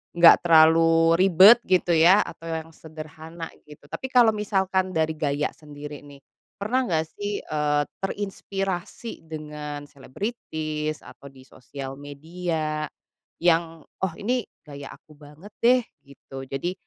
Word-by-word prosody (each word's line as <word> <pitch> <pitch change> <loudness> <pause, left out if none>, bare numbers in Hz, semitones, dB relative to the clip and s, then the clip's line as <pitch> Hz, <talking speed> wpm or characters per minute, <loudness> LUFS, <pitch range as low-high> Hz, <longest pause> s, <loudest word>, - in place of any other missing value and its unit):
enggak 170 -1 +8
terlalu 165 0 +5
ribet 195 +5 +8
gitu 180 -2 +2
ya 175 +5 +6
atau 165 - -10
yang 160 0 -5
sederhana 160 +1 -9 0.2
gitu 150 -1 -15
tapi 265 - -5
kalau 245 -3 +5
misalkan 190 -3 0
dari 160 0 +1
gaya 145 -1 -1
sendiri 150 -1 -10
nih, 140 -1 -14 0.4
pernah 245 +6 0
enggak 160 -4 0
sih, 205 0 -3
eee, 150 -1 0 0.2
terinspirasi 195 +1 -4
dengan 150 -2 -7
selebritis 155 - -5
atau 140 - -13
di 130 -1 -16
sosial 135 +1 -9
media, 155 +1 -4 0.5
yang 165 -2 +1 0.2
oh 190 -3 -1
ini 245 +2 0 0.2
gaya 140 -1 -9
aku 155 - -20
banget 150 +7 -14
deh 250 +2 +5 0.2
gitu 135 -1 -11
jadi, 135 +7 -3
160 Hz, 130 wpm, -24 LUFS, 150-190 Hz, 0.5 s, enggak